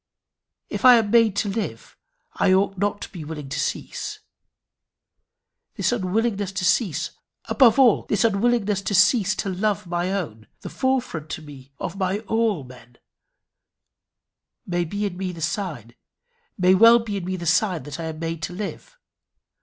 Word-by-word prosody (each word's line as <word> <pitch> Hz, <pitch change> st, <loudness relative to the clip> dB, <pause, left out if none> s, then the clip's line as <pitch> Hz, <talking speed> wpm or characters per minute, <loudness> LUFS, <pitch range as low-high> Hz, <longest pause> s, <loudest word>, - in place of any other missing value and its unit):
If -, -, -5 dB
I 250 Hz, -1 st, +9 dB
am 220 Hz, -3 st, +1 dB
made 230 Hz, -4 st, +4 dB
to 205 Hz, -, 0 dB
live 205 Hz, +2 st, -4 dB, 0.4 s
I 185 Hz, -, +2 dB
ought 195 Hz, +1 st, +2 dB
not 205 Hz, +2 st, -1 dB
to -, -, -6 dB
be 175 Hz, -5 st, -8 dB
willing 150 Hz, -2 st, -7 dB
to 140 Hz, -, -3 dB
cease. -, -, -4 dB, 1.6 s
This -, -, 0 dB
unwillingness 205 Hz, -1 st, -1 dB
to 185 Hz, -, -2 dB
cease 180 Hz, -, +1 dB, 0.3 s
above 250 Hz, -4 st, +4 dB
all, 255 Hz, -5 st, +4 dB
this 205 Hz, -, +2 dB
unwillingness 215 Hz, -2 st, +1 dB
to 200 Hz, +1 st, -2 dB
cease 200 Hz, +1 st, +4 dB
to 200 Hz, -, -3 dB
love 195 Hz, +1 st, -1 dB
my 175 Hz, +1 st, -2 dB
own, 130 Hz, -, -4 dB
the -, -, -8 dB
fore 260 Hz, -1 st, +1 dB
front 155 Hz, -, -8 dB
to 160 Hz, -, -13 dB
me 140 Hz, -3 st, -13 dB
of 180 Hz, -, -5 dB
my 190 Hz, 0 st, 0 dB
all 225 Hz, -6 st, 0 dB
men 125 Hz, -2 st, -15 dB, 1.7 s
may 175 Hz, -1 st, -1 dB
be 205 Hz, +5 st, -3 dB
in 185 Hz, -3 st, -4 dB
me 185 Hz, -1 st, -3 dB
the 170 Hz, -, -10 dB
sign, 160 Hz, -, -4 dB, 0.6 s
may 185 Hz, -1 st, +4 dB
well 230 Hz, +5 st, +7 dB
be 220 Hz, -3 st, -3 dB
in 185 Hz, -, -5 dB
me 185 Hz, +1 st, -2 dB
the 175 Hz, -2 st, -6 dB
sign 175 Hz, -1 st, +1 dB
that 145 Hz, +2 st, -8 dB
I 165 Hz, -, -4 dB
am 160 Hz, -1 st, -5 dB
made 165 Hz, 0 st, -4 dB
to 170 Hz, -, -4 dB
live. 215 Hz, -, -7 dB
190 Hz, 170 wpm, -23 LUFS, 165-215 Hz, 1.7 s, I